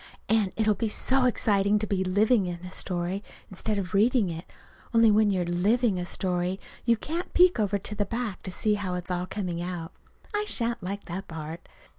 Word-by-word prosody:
And 215 -4 +2
it'll 215 -1 +3
be 225 +3 -1
so 265 +4 +2
exciting 205 -4 +3
to 210 - -1
be 195 -2 0
living 205 +2 +3
a 175 +1 -7
story 185 +2 -3 0.3
instead 210 +3 -2
of 185 -2 -3
reading 215 -1 +3
it 165 +1 -6 0.5
only 230 -1 +7
when 210 0 +4
you're 185 -3 +1
living 200 +4 +2
a 175 - -2
story 180 +1 -1 0.3
you 235 -1 +4
can't 335 - -4
peek 360 -7 +6
over 205 -1 +1
to 200 - -4
the 205 -1 0
back 230 -4 -3
to 185 - -5
see 210 +4 +1
how 195 -3 -2
it's 180 0 -3
all 180 0 -1
coming 185 -4 -3
out. 175 -2 -4 0.4
I 420 0 0
shan't 235 - -1
like 200 +3 -5
that 190 +3 -5
part. 160 +1 -7
200 Hz, 195 wpm, -27 LUFS, 180-220 Hz, 0.5 s, only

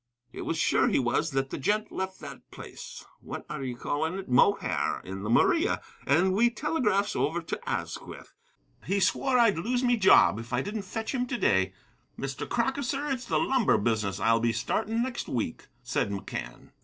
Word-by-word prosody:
It - - -6
was 165 - -1
sure - - +3
he - - +2
was 130 +5 +1
that 135 -1 -1
the - - -4
gent 210 +9 0
left 190 0 -4
that - - -10
place, 485 -1 -10
what - - -7
are 150 -2 -4
ye 125 -2 -4
calling 160 +7 -2
it? 195 - -7
Mohair, 165 +11 +2
in 95 +1 -6
the 105 - -4
Maria, 335 - +3 0.3
and 185 +1 +3
we 235 +5 +4
telegraphs 235 -6 0
over 160 +4 0
to - - -5
Asquith. - - -5 0.5
He 195 +3 0
swore 250 +7 +2
I'd 230 -8 +4
lose 245 +7 0
me 245 -1 +3
job 110 - +6
if 115 +1 -8
I 125 +2 +1
didn't 210 +1 -4
fetch 225 +3 -3
him 250 -1 -1
to 245 - -2
day. 95 - +2 0.4
Mr. 135 0 -5
Crocker, 245 +4 0
sir, 280 +3 -2
it's 255 -2 -3
the - - 0
lumber 260 -5 +3
business 105 -2 -1
I'll 115 +3 +3
be 115 0 +1
startin' 220 - -1
next 255 -1 -4
week," 115 -10 -3 0.2
said - - -1
McCann. 100 -1 -6
190 Hz, 190 wpm, -28 LUFS, -, 0.5 s, job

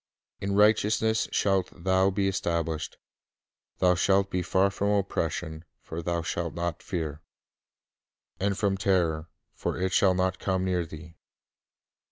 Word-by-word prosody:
'• - - -8
In 100 0 -1
righteousness 110 +1 +3
shalt 95 -2 +1
thou 95 +1 +3
be 95 0 0
established: 85 -4 -2 0.8
Thou 90 -1 +4
shalt 95 +2 +2
be 90 - 0
far 95 +3 +2
from 100 +1 -1
oppression; 85 -5 -1 0.2
for 80 +1 -6
thou 85 0 -1
shalt 85 0 -3
not 85 0 -3
fear: 80 -6 -4 1.2
And 100 0 0
from 100 -2 +1
terror; 85 -5 +1 0.2
for - - -3
it 95 0 -1
shall 95 -2 +4
not 95 0 0
come 95 -1 0
near 90 -2 0
thee."" 80 +1 -11
95 Hz, 140 wpm, -27 LUFS, 85-100 Hz, 1.2 s, Thou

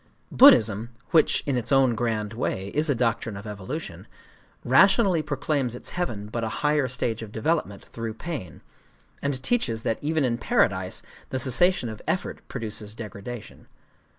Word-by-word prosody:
Buddhism—which, 115 - +4
in 140 -3 0
its 120 +2 -3
own 135 -3 +4
grand 110 -2 -2
way, 100 -4 -3
is 150 +7 0
a 140 - +3
doctrine 115 -3 -1
of 100 - -9
evolution—rationally 150 - 0
proclaims 140 -4 -1
its - - -6
heaven 120 - -3
but 115 +2 -4
a 110 - -1 0.2
higher 150 -2 +3
stage 115 -2 -2
of 110 -2 -8
development 110 -3 -1
through 115 -1 -6
pain, 145 - -6 0.6
and 140 -2 -2
teaches 115 - 0
that 115 - -1
even 155 +1 0
in 120 -1 -1
paradise - - 0 0.3
the 130 - -2
cessation 130 +4 +3
of 110 -1 -7
effort 185 - -2
produces 110 -3 -5
degradation. 110 +1 -9
120 Hz, 145 wpm, -25 LUFS, 110-145 Hz, 0.6 s, Buddhism—which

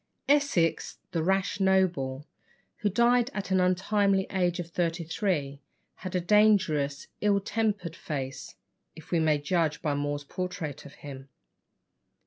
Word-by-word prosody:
Essex, 280 - +2
the 165 - -1
rash 190 +2 0
noble, 175 -8 +1 0.5
who 210 - 0
died 235 +4 +3
at 205 -1 -2
the 185 -1 +2
untimely 195 +1 +2
age 180 -2 0
of 170 -1 -5
thirty 170 -1 -1
three, 155 -5 -2 0.4
had 185 -1 -6
a - - +3
dangerous, 175 -8 +3
ill 205 -1 +3
tempered 200 -5 -2
face, 135 -3 -5 0.4
if 160 - -14
we 170 - +3
may 155 -2 +3
judge 155 +1 0
by 150 -3 +1
More's 145 0 -2
portrait 165 -3 -5
of 140 - -15
him. 135 -1 -9
175 Hz, 135 wpm, -28 LUFS, 150-195 Hz, 0.5 s, died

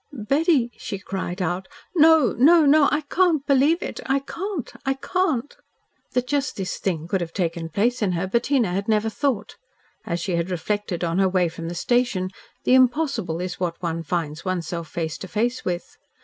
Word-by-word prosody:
"Betty," 275 +1 +1
she 200 - -5
cried 190 -1 -4
out. 180 +2 -2 0.3
"No! 320 -5 +5
No! 315 +6 +6
No! 290 0 +6
I 300 - +1
can't 315 -1 +1
believe 285 +5 +3
it! - - -5
I 270 - +3
can't! 340 - -5
I 270 0 0
can't!" 290 - -1 0.6
That 250 -1 +1
just 280 +1 -1
this 190 -2 -4
thing 165 -4 -2
could 190 +1 0
have 165 -1 -5
taken 165 -3 -2
place 230 +9 0
in 195 -4 +1
her, 175 +2 -1
Bettina 235 +2 +1
had 195 +3 -2
never 220 0 +2
thought. 225 -3 -2 0.5
As 170 0 -2
she 180 +1 -1
had 170 +2 -1
reflected 185 0 -2
on 170 +2 0
her 190 -1 +4
way 180 -2 +2
from 165 0 -7
the 175 - -5
station, 210 -3 +1 0.3
the - - +3
impossible 255 - +2
is 180 0 -4
what 175 -2 -2
one 165 -1 -2
finds 165 -1 -3
one's 185 -3 -2
self 170 -2 -4
face 160 0 -3
to 190 - -7
face 235 +6 -1
with. 175 -1 -4
210 Hz, 190 wpm, -23 LUFS, 175-275 Hz, 0.6 s, No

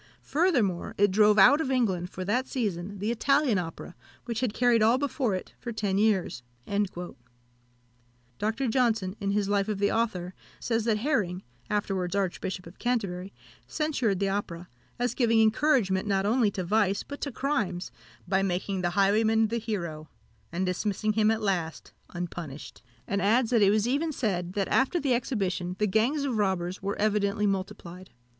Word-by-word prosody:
Furthermore, 255 - +1
it 205 -1 +4
drove 210 +1 +5
out 265 +10 +7
of 265 - -2
England, 195 -9 0
for 185 - -6
that 245 +7 0
season, 200 -5 -3
the 210 +4 -1
Italian 265 -2 +2
Opera, 170 +1 -7 0.3
which 235 -2 -3
had 250 -4 0
carried 240 0 +3
all 225 +3 +5
before 265 -6 -1
it 185 - -7
for 240 - -5
ten 205 -3 -1
years." 200 - +1 2.0
Dr. 225 +5 -1
Johnson, 225 -6 +1
in 200 - -2
his 200 0 +1
life 200 0 +1
of 210 -2 -2
the 200 +1 +1
author, 190 -6 -1 0.3
says, 225 -2 -1
that 225 -2 +2
Herring, 210 -8 -1 0.3
afterwards 195 -3 -1
Archbishop 190 -1 -2
of 170 +3 -13
Canterbury, 200 -6 -2 0.4
censured 265 - 0
the 200 - +1
opera, 180 -3 -4 0.3
as 245 -1 0
giving 230 -3 +3
encouragement, 220 -4 +2
not 195 -1 +1
only 225 0 +3
to 190 -2 -4
vice, 200 +1 +1
but 285 - -9
to 280 - -3
crimes, 230 -10 -2 0.4
by 190 0 +2
making 190 0 -1
the 175 +2 -2
highwayman 220 +2 +3
the 235 +1 -1
hero, 170 -9 -4 0.4
and 180 +3 -1
dismissing 205 +3 -1
him 215 0 +3
at 225 0 0
last 175 -5 -2 0.2
unpunished; 170 -4 -7 0.3
and 200 0 -1
adds, 225 +4 +2
that 230 -3 +4
it 200 - +6
was 215 +2 +2
even 295 +6 0
said, 185 - -2
that 200 -1 -1
after 270 +7 +2
the 275 -4 +1
exhibition 190 -7 -1
the 210 - +1
gangs 230 +9 +1
of 260 -5 -1
robbers 185 -3 -1
were 200 +1 -3
evidently 210 -1 +1
multiplied. 185 -2 -4
210 Hz, 165 wpm, -27 LUFS, 190-235 Hz, 2.0 s, out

